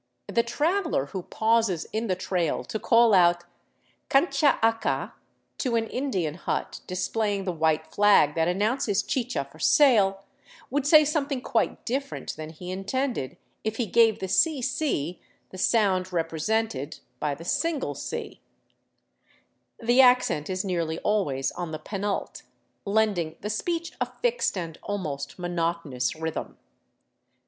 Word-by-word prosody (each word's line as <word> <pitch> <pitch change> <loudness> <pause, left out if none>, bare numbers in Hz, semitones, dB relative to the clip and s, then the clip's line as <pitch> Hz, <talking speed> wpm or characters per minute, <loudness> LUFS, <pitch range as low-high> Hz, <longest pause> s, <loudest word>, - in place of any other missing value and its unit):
The 235 - +1
traveler 315 - 0
who 185 +6 -5
pauses 220 -4 +1
in 220 +2 -1
the 185 - +1
trail 180 -3 -1
to 220 - -4
call 230 0 +4
out 175 -2 +5 0.3
" - - -40
Cancha 285 +1 +3
acca?" 225 0 +1 0.5
to 250 -4 0
an 225 -1 +1
Indian 210 - -2
hut 170 - -4
displaying 200 +2 -1
the 185 - -1
white 160 -2 +1
flag 205 -8 +4
that 165 +1 +1
announces 205 +3 +1
chicha 245 - -2
for 155 - -16
sale, 200 - +4 0.5
would 285 +1 0
say 305 0 +7
something 290 -2 -1
quite 235 -2 -1
dif 275 +3 -2
ferent - - -6
than 155 0 -7
he 180 +3 -8
intended 200 - -2 0.3
if 220 0 -2
he 240 - 0
gave 225 +1 +4
the - - -4
cc 265 - 0 0.3
the 185 - -9
sound 190 -4 +2
represented 165 -2 -1 0.2
by 150 -2 -1
the 165 +4 -11
single 325 - -1
c. - - -6 1.4
The 240 +3 +5
accent 250 - +3
is 185 +1 -2
nearly 170 -4 -1
always 145 -11 0
on 175 -2 -5
the 155 - -3
penult, 200 +3 -4 0.4
lending 200 -6 +1
the 210 - -3
speech 335 +9 -2
a - - +1 0.2
fixed 475 - +1
and 165 -3 -5
almost 150 -9 -4
monotonous 165 -8 -2
rhythm. 160 0 -5
200 Hz, 140 wpm, -26 LUFS, 170-240 Hz, 1.4 s, say